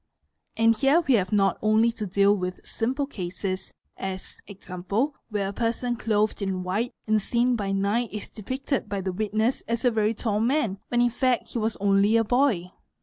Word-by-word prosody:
And 225 0 +4
here 275 +9 +4
we 270 - +5
have 190 -5 +2
not 195 -3 +2
only 220 +2 +4
to 220 -2 -5
deal 200 +2 +4
with 180 -2 -5
simple 260 +5 -1
cases 185 -5 -4 0.3
as, 190 -1 -6
e.g., 200 -1 -12 0.6
Where 205 -3 -1
a - - -6
person 240 +2 -1
clothed 215 -2 0
in 190 -2 -2
white 205 +7 -2
and 215 -1 +2
seen 240 +4 +2
by 200 -3 -2
night 200 +4 0
is 210 -1 -6
depicted 260 +2 -3
by 200 -1 -2
the 190 -1 -3
witness 215 +5 0
as 230 +1 -1
a 245 - +5
very 220 0 +1
tall 210 -2 -1
man, 230 -4 +1
when 240 0 +1
in 240 0 +3
fact 255 0 0
he 235 - -3
was 220 0 0
only 200 +2 +3
a 225 - +3
boy. 225 -7 +1
215 Hz, 190 wpm, -26 LUFS, 195-235 Hz, 0.6 s, we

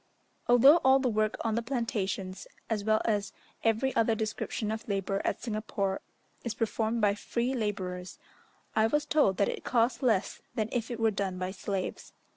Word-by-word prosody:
Although 255 +6 +8
all 265 -4 +5
the 265 -1 0
work 215 0 +1
on 225 - 0
the 230 - +1
plantations, 205 -6 -3 0.2
as 210 -2 0
well 215 +1 +2
as 210 -2 0 0.3
every 225 +4 +1
other 225 0 +3
description 215 0 -2
of 220 +3 -5
labour 195 -1 -1
at - - -2
Singapore, 210 -3 -2 0.4
is 235 -3 -3
performed 225 +1 0
by 205 -1 +4
free 235 +4 -2
labourers, 185 -6 -3 0.6
I 220 0 +4
was 295 +5 +1
told 200 -12 +3
that 200 - +3
it - - -4
cost 240 +2 +1
less 225 -7 +1
than 215 -1 -1
if 235 -2 -2
it 240 -2 -4
were 225 -1 +3
done 195 -2 -2
by 185 0 -3
slaves. 190 -1 -4
220 Hz, 175 wpm, -30 LUFS, 200-235 Hz, 0.6 s, Although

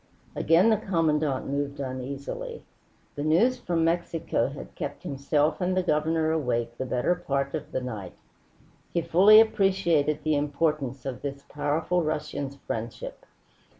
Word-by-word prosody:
Again 175 +8 +4
the 220 - +4
Commandante 155 -8 0
moved 140 0 -2
uneasily. 140 - -5 0.5
The 145 - -5
news 175 - +3
from 170 -2 0
Mexico 165 0 0
had - - -9
kept - - -6
himself 145 +4 0
and 185 +1 0
the 185 - +2
Governor 160 -1 +1
awake 120 -6 -1
the 130 - -2
better 125 +7 +1
part 140 -6 -2
of - - -5
the - - -2
night. 105 -8 -6 0.8
He 170 - +3
fully 190 +6 +7
appreciated 185 -8 +2
the 155 -1 +2
importance 145 -2 -1
of 130 -3 -4
this 140 -1 -5
powerful 160 +4 0
Russian's 150 -3 -3
friendship. 115 -4 -6
150 Hz, 140 wpm, -27 LUFS, 140-170 Hz, 0.8 s, fully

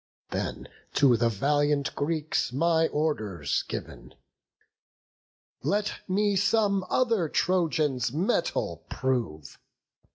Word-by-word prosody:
Then, - - -3 0.3
to 135 -4 +5
the 115 +1 +2
valiant 145 +5 +1
Greeks 155 -2 -1
my 160 +4 +2
orders 105 - -1
giv'n. - - -7 1.5
Let 205 +1 0
me 205 +1 +1
some 200 0 +2
other 230 -10 +2
Trojan's 155 -10 +1
mettle 145 - -1
prove." 110 - -2
150 Hz, 90 wpm, -27 LUFS, 125-185 Hz, 1.5 s, to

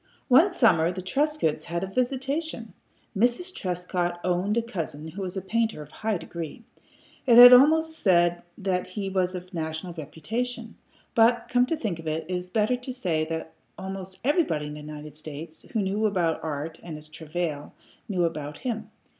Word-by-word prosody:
One 320 +10 +7
summer 180 - +4
the 185 0 -6
Trescotts 270 - 0
had 170 +1 -3
a - - 0
visitation. 270 - -2 0.4
Mrs. 245 - +1
Trescott 180 - -2
owned 185 +4 +1
a 235 - +2
cousin 160 -8 -5
who 190 +5 -7
was 185 0 -4
a 190 - -3
painter 225 -5 0
of - - -16
high 220 -2 -1
degree. 170 +5 -7 0.6
I 240 - +6
had 245 +1 +12
almost 320 +5 +5
said 175 -3 +3 0.2
that 185 -2 -1
he 195 +1 -4
was 185 -1 0
of 180 +1 -8
national 160 +1 -4
reputation, 220 - -4 0.4
but, 235 +1 +4
come 245 0 +3
to 325 - -1
think 205 - -3
of 160 - -8
it, 155 +1 -2
it 185 - -3
is 180 0 -3
better 215 +5 +1
to 250 +1 -7
say 175 -11 -1
that 160 0 -5 0.2
almost 190 0 -6
everybody 275 - +1
in 150 - -6
the 150 - -8
United 150 0 -9
States 155 +1 -8
who 225 - 0
knew 205 +3 +1
about 175 -5 0
art 155 +1 -4
and 165 -3 -7
its 155 0 -12
travail 155 -1 -4 0.3
knew 185 -3 +1
about 150 -3 -3
him. 235 -4 -4
185 Hz, 180 wpm, -26 LUFS, 160-235 Hz, 0.6 s, had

